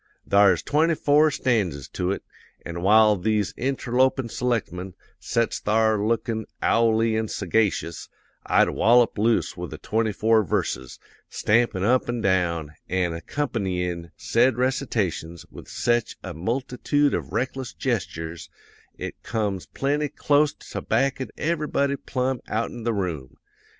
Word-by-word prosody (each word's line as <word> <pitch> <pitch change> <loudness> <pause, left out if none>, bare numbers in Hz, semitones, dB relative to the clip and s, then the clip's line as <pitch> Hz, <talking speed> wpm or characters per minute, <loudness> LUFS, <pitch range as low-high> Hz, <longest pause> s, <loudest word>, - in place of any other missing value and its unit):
Thar's 100 -4 +4
twenty 160 +3 +2
four 150 +1 +4
stanzas 100 - -1
to 90 - -2
it; 100 - -3 0.4
an' 85 0 -5
while 105 +2 +6
these 105 +1 0
interlopin' 130 -1 0
selectmen 100 -7 -2 0.2
sets 115 -1 -1
thar 110 -1 +2
lookin' 115 0 -1
owley 115 -1 +2
an' 110 0 0
sagacious, 100 -4 -1 0.3
I'd - - +3
wallop 120 0 +4
loose 115 +2 +1
with - - -6
the - - -7
twenty 110 0 0
four 110 +1 +3
verses, 65 -7 -2 0.3
stampin' 105 -4 +1
up 125 +4 +2
and 120 -2 -2
down, 85 -5 +1 0.2
an' 90 -1 0
accompanyin' 90 - -3
said 120 +1 +2
recitations 110 - -1
with - - -11
sech 120 -1 0
a 90 - -6
multitood 125 - 0
of - - -3
reckless 130 0 -2
gestures, 85 - -4 0.5
it - - -7
comes 105 -5 -2
plenty 145 +2 -1
clost 145 +1 +1
to - - -4
backin' 135 -1 0
everybody 150 -3 0
plumb 130 -2 -2
outen 115 +1 -3
the 115 - +1
room. 85 -10 -4
110 Hz, 130 wpm, -24 LUFS, 95-130 Hz, 0.5 s, while